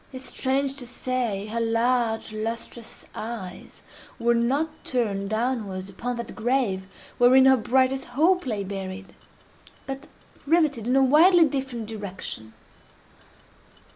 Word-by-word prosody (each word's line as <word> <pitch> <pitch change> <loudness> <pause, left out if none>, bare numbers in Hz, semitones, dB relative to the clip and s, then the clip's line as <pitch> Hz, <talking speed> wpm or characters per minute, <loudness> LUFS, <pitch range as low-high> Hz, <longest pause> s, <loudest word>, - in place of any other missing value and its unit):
Yet—strange 265 +1 -1
to 250 -3 -5
say!—her 230 -4 -2
large 230 -1 +1
lustrous 225 +1 -5
eyes 215 -5 -7 0.3
were 235 0 +2
not 275 +7 0
turned 200 -6 -1
downwards 215 -5 -2
upon 245 +6 -4
that 235 -1 -6
grave 220 -5 0 0.3
wherein 255 +2 +7
her 265 0 +7
brightest 260 +2 +1
hope 320 +6 +2
lay 210 -4 -1
buried—but 195 +8 -9 0.4
riveted 295 -8 +2
in 250 - +2
a 270 - +5
widely 330 +6 +6
different 265 -5 -3
direction! 195 - -6
240 Hz, 105 wpm, -25 LUFS, 215-265 Hz, 0.4 s, wherein